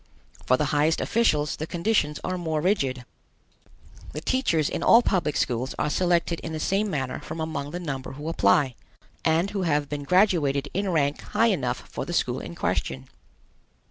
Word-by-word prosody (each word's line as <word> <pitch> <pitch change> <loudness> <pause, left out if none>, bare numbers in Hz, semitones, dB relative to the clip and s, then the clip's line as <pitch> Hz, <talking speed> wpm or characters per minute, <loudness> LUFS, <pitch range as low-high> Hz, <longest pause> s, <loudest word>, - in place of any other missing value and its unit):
For 130 - +4
the 150 - +1
highest 150 +2 +2
officials 150 -11 +1
the 155 - -4
conditions 170 -4 0
are 185 - -2
more 160 -3 -2
rigid. 140 - 0 1.1
The 150 - -5
teachers 170 - +1
in - - -3
all 235 +1 +6
public 170 -10 0
schools 125 +2 -1
are 150 - 0
selected 170 -1 +1
in 160 - -6
the 155 - -3
same 200 +6 0
manner 135 -6 -2
from 165 - -7
among 155 -3 -3
the 175 +4 -5
number 135 -7 -5
who 145 +3 -7
apply, 130 -2 +3 0.5
and 165 +5 +2
who 200 -2 -2
have 150 -5 0
been 145 -1 -3
graduated 145 -5 +2
in 195 +1 -1
rank 145 -4 +1
high 225 +2 +2
enough 185 - -3
for - - -5
the - - -5
school - - 0
in - - -8
question. 65 0 -2
160 Hz, 175 wpm, -25 LUFS, 145-180 Hz, 1.1 s, all